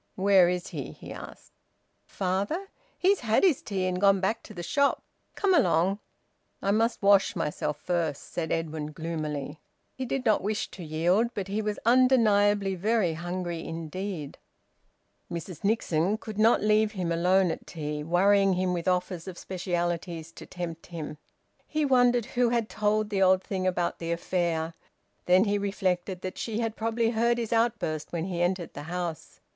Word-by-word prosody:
"Where 190 -2 +5
is 180 -1 -2
he?" - - -6
he - - -10
asked. - - -11 0.6
"Father? 200 - -2 0.3
He's 390 +2 +3
had 225 - +2
his 350 -8 +4
tea 190 -3 -2
and 185 0 -1
gone 195 -1 +5
back 195 +4 0
to 215 - -12
the 175 - -5
shop. 280 +9 +1 0.3
Come 395 -2 +2
along." 185 - +3 0.6
"I 200 - 0
must 225 +1 +1
wash 200 -1 +5
myself 150 -3 -2
first," 165 -3 -2
said 160 -2 -2
Edwin 155 -2 -3
gloomily. 155 -2 -4 0.3
He 260 - -4
did 255 +1 -2
not 215 -2 +3
wish 210 +2 -2
to 180 - -9
yield, 170 +8 +2
but 195 -2 -4
he 210 +2 -1
was 210 -1 -2
undeniably 210 -5 +4
very 195 -1 +1
hungry 175 0 -4
indeed. 165 -1 -5 0.9
Mrs 170 -1 -6
Nixon 200 -2 +1
could 220 -2 -7
not 225 0 +4
leave 215 0 +3
him 180 -4 -2
alone 180 +2 +3
at - - -7
tea, 150 -2 -4
worrying 195 +4 +4
him 180 0 0
with 170 0 -3
offers 180 -1 -1
of 185 -2 -7
specialities 175 -2 -3
to - - -12
tempt 170 -2 -6
him. 155 -3 -7 0.5
He 305 -1 0
wondered 245 -3 +4
who 245 +1 +1
had 235 -2 0
told 215 0 0
the 195 -1 0
old 185 0 +4
thing 185 -1 -2
about 180 -1 -1
the 165 0 -3
affair. 170 -1 -1 0.5
Then 180 +2 +6
he 205 -1 +1
reflected 190 -2 -1
that 185 - -5
she 225 -1 -3
had 225 -1 -2
probably 225 +1 0
heard 235 +1 +2
his 235 -1 -2
outburst 225 -10 0
when 170 -1 -2
he 180 -2 -3
entered 175 0 -1
the - - -7
house. 175 -2 -5
185 Hz, 170 wpm, -28 LUFS, 170-215 Hz, 0.9 s, Then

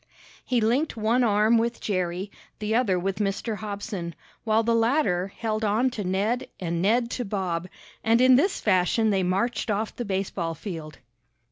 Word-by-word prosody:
He 245 -2 +1
linked 245 +6 +1
one 225 +3 +2
arm 215 +1 +4
with 235 +1 -1
Jerry, 185 0 -2 0.3
the 215 0 -2
other 225 -6 +2
with 190 +2 -2
Mr. 210 +2 -1
Hobson, 200 -5 -5 0.3
while 220 0 +2
the 230 +1 +2
latter 230 - +2
held 215 +2 -3
on 220 +5 +2
to 220 -4 -4
Ned 200 +6 0
and 170 -2 -2
Ned 235 +5 +2
to 250 - -2
Bob, 185 -5 -2 0.4
and 225 +1 +4
in 255 +1 +6
this 370 +10 +2
fashion 210 +3 +2
they 195 -1 +2
marched 195 +7 0
off 215 +1 -1
the 245 - -3
baseball 190 -5 -2
field. 160 -5 -7
210 Hz, 165 wpm, -26 LUFS, 190-230 Hz, 0.4 s, in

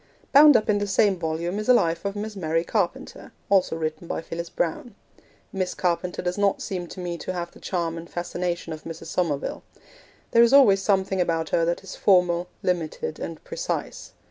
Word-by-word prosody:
Bound 290 -2 +8
up 215 - -2
in 210 -2 +2
the 205 - -2
same 200 0 +3
volume 170 +4 -2
is 215 - -4
a 250 - +8
Life 165 -4 +1
of 200 0 -2
Miss 210 +1 -5
Mary 165 -3 0
Carpenter, 190 -1 -3 0.2
also 190 -4 +3
written 155 +1 -4
by - - -2
Phyllis 165 +1 -6
Browne. 185 +6 -3 0.6
Miss 185 -2 -2
Carpenter 180 0 -1
does 180 +2 -2
not 200 -1 +2
seem 180 -2 -4
to 185 - -10
me 175 -1 -4
to 185 - -4
have 175 -1 -4
the - - -16
charm 170 -3 -2
and 170 - -11
fascination 175 -1 -3
of 155 - -9
Mrs. 165 -1 -8
Somerville. 155 -6 -1 0.7
There 230 - +6
is 235 +2 +5
always 215 -9 +7
something 190 -1 +1
about 165 -2 0
her 165 - +2
that 170 +3 -1
is 190 - -8
formal, 180 -2 +3 0.2
limited, 165 -3 -2
and 165 -2 -6
precise. - - -4
180 Hz, 195 wpm, -25 LUFS, 165-200 Hz, 0.7 s, Bound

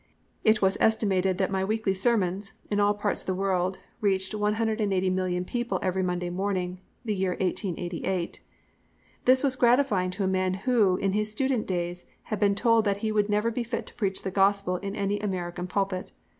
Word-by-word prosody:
It 215 -1 +4
was 190 0 +2
estimated 190 -4 +2
that 190 0 0
my 190 -1 0
weekly 215 0 0
sermons, 195 -1 +1 0.2
in 205 - +1
all 205 0 +3
parts 205 0 -1
of - - -11
the 185 - 0
world, 185 -1 0 0.2
reached 190 -1 0
180,000,000 200 -4 0
people 240 +4 -2
every 190 0 0
Monday 180 -1 -1
morning 185 -1 -2 0.3
the 215 - 0
year 190 -2 -1
1888. 180 -1 -2 0.9
This 255 +2 +5
was 270 -2 +2
gratifying 240 -7 +3
to 190 +2 -3
a - - +1
man 185 0 +1
who, 205 -3 +2
in 195 0 0
his 210 +2 -1
student 260 0 0
days, 175 -1 -2 0.2
had 215 - -4
been 200 0 +3
told 230 +2 +3
that 200 -1 +1
he 215 - +1
would 210 -1 +1
never 210 +3 +1
be 245 - -2
fit 235 0 -4
to - - -8
preach 195 -5 -1
the 190 - -3
Gospel 195 -1 +2
in 200 +2 -5
any 200 0 -1
American 180 -3 -3
pulpit. 190 -1 -2
195 Hz, 185 wpm, -27 LUFS, 185-215 Hz, 0.9 s, This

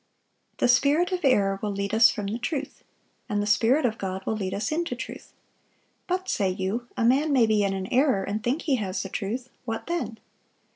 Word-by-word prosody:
(646) - - -42
"The - - +8
spirit 300 +8 +2
of 365 -1 -2
error 195 -7 +3
will 210 - -2
lead 200 +1 -3
us 225 +2 +7
from 210 -5 -3
the 215 +4 -3
truth; 280 +2 -4 0.5
and 205 - 0
the 205 - 0
Spirit 230 +7 +3
of 225 -2 -1
God 190 0 -4
will 220 - -1
lead 190 -3 -3
us 210 +6 -2
into 340 +2 -1
truth. - - -8 0.8
But, 370 0 -1
say 195 - +1
you, 195 +6 -2
a 230 - +1
man 280 +6 +3
may 255 -4 +5
be 215 -2 +2
in 195 -1 0
an 190 -1 -3
error, 255 -6 +3
and 210 +2 -3
think 260 +8 -1
he 280 -6 +1
has 195 -3 -3
the 195 - -6
truth. 235 +7 -4
What 225 -2 -4
then? 340 -10 -3
225 Hz, 220 wpm, -26 LUFS, 200-275 Hz, 0.8 s, The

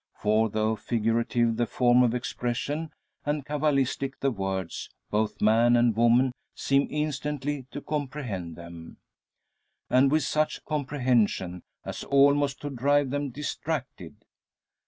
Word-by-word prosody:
For 110 +1 +2
though 110 +1 0
figurative 115 +1 0
the 120 -1 +1
form 125 +1 +4
of 125 -1 +3
expression, 125 +5 -3 0.3
and 145 -1 -2
cabalistic 140 -2 0
the 135 - +1
words, 95 -5 -4 0.2
both 105 0 0
man 115 +3 +5
and 120 -2 +3
woman 120 +3 +4 0.2
seem 140 0 +1
instantly 145 -2 -3
to 145 - -7
comprehend 130 - -4
them. 85 -1 -11 0.9
And 130 +2 +5
with 155 -1 +3
such 155 +2 -1
comprehension, 125 - 0 0.2
as - - -5
almost 140 0 +3
to 145 - -4
drive 140 +1 +2
them 145 0 -1
distracted! 150 +1 -5
130 Hz, 120 wpm, -27 LUFS, 115-145 Hz, 0.9 s, man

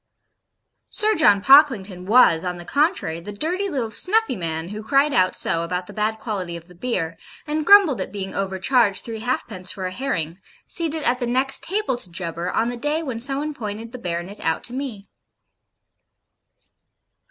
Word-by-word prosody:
Sir 430 +1 +5
John 205 - +4
Pocklington 215 - +4
was, 210 -8 +5
on 180 -1 -3
the 175 - -10
contrary, 285 - 0
the 180 +5 -8
dirty 350 - -2
little 250 -9 -2
snuffy 425 - +2
man 165 -2 -4
who 210 +1 -6
cried 275 +5 +2
out 185 -4 +2
so 165 - 0
about 180 +2 -3
the - - -11
bad 215 +1 -1
quality 190 -6 -4
of 170 0 -14
the 180 - -16
beer, 170 -5 -3 0.3
and 305 0 -2
grumbled 395 - +6
at - - -5
being 195 -2 -5
overcharged 195 +2 +1
three 225 -2 -5
halfpence 220 -6 -3
for 190 -2 -3
a 185 - -3
herring, 185 - -3 0.3
seated 320 -2 -2
at 250 +1 +2
the 245 - -2
next 260 +3 +1
table 390 - -1
to 215 - -8
Jubber 170 0 -4
on 230 - 0
the 245 - -5
day 295 +6 -1
when 255 -6 -4
some 270 +3 -1
one 300 +2 -3
pointed 225 -3 -6
the 250 - -8
Baronet 175 +1 -5
out 160 - -1
to 240 - -5
me. 250 -7 -5
220 Hz, 180 wpm, -22 LUFS, 185-275 Hz, 0.3 s, grumbled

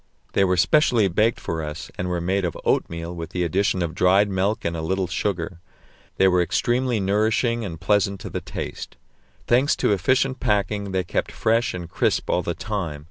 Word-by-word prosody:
They 100 - +3
were 90 -1 +2
specially 120 - +4
baked 110 +6 +1
for 80 -1 -3
us, 75 0 -6
and 90 - -3
were 90 -1 -1
made 95 +3 0
of 85 -3 -2
oatmeal 85 +1 -1
with 80 -2 -6
the 90 -1 -2
addition 95 +2 +1
of 80 -2 -3
dried 95 +3 +3
milk 95 +3 0
and 85 - -1
a 80 - -3
little 95 +4 -1
sugar; 90 -1 -3 0.6
they 95 - +5
were 90 -1 +3
extremely 120 +7 +1
nourishing 110 +4 +1
and 85 -6 -6
pleasant 100 0 +1
to - - -6
the - - -3
taste. - - -7 0.5
Thanks 130 +5 +3
to - - +1
efficient 130 +7 +1
packing, 100 -2 0
they 95 -1 0
kept 90 - -2
fresh 115 0 +1
and 85 -2 -6
crisp - - 0
all 90 - +2
the 85 0 -3
time. 100 -10 -4
95 Hz, 190 wpm, -23 LUFS, 85-105 Hz, 0.6 s, they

